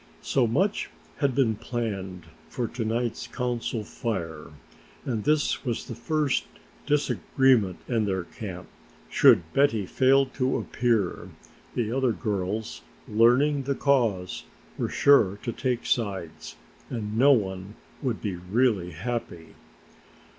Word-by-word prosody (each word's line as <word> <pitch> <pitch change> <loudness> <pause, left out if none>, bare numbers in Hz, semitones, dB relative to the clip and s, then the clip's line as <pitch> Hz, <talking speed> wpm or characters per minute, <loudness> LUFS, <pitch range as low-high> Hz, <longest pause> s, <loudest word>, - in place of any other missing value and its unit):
So 130 -4 +2
much 190 - 0 0.3
had 140 -4 +1
been 130 -5 +3
planned 100 -6 -4 0.2
for 120 -2 -2
to 120 +1 -4
night's 115 +1 -2
Council 120 -3 -2
Fire 85 -9 -4 0.6
and 115 -5 -2
this 150 -1 +1
was 120 -4 -2
the 125 - -6
first 145 +4 0 0.4
disagreement 130 - +2
in 115 -3 +1
their 95 -2 -1
camp. 90 -1 -8 0.4
Should - - +6
Betty 135 -8 +3
fail 135 +6 +4
to 130 0 -1
appear, 115 -7 -1 0.5
the 115 -3 -1
other 130 -2 +1
girls, 105 0 -3 0.3
learning 125 +7 +4
the 140 0 0
cause, 115 -12 +1 0.3
were - - -2
sure 110 -9 +4
to 120 - -2
take 125 0 -2
sides 95 -8 -2 0.3
and 110 -3 -4
no 135 +5 +6
one 95 -3 -2 0.3
would 125 -5 -2
be 100 -5 -2
really 95 -1 0
happy. 85 -4 -5
115 Hz, 125 wpm, -26 LUFS, 100-130 Hz, 0.6 s, Should